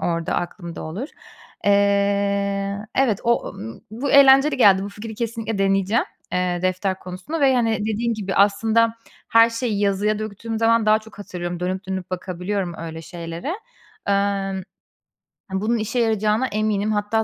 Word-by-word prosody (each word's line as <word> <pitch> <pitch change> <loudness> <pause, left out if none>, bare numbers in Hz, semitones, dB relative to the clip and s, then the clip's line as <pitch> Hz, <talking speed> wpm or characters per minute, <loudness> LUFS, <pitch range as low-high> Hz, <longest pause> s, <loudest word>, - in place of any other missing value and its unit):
orada 170 -1 -1
aklımda 170 -1 -4
olur. 200 - -5 0.6
Eee, 200 0 +2 0.2
evet, 250 -7 +2
o 235 0 +1 0.4
bu 255 +5 -3
eğlenceli 275 +1 +7
geldi. 195 -6 +6
Bu 200 - -4
fikri 210 +2 -8
kesinlikle 225 -2 -3
deneyeceğim, 195 +3 +2 0.3
eee, 180 -1 0
defter 185 +1 0
konusunu 185 - -6
ve, 270 -2 +5
hani, 225 -3 +1
dediğin 220 +2 -1
gibi, 200 -3 -3
aslında 220 +3 +3 0.3
her 230 0 +6
şeyi 230 -3 -2
yazıya 205 +1 +1
döktüğüm 220 +1 -5
zaman 230 -1 +3
daha 215 0 +5
çok 220 -1 -16
hatırlıyorum. 175 -3 -5
Dönüp 185 +2 -3
dönüp 190 -1 -4
bakabiliyorum 185 0 -3
öyle 165 0 -6
şeylere. 170 - -5 0.5
Emm, 200 -1 0 0.9
ha, 190 +1 -1
bunun 230 +2 +1
işe 225 +3 -2
yarayacağına 220 +2 +1
eminim 215 0 0
hatta 210 +2 0
205 Hz, 145 wpm, -22 LUFS, 190-225 Hz, 0.9 s, eğlenceli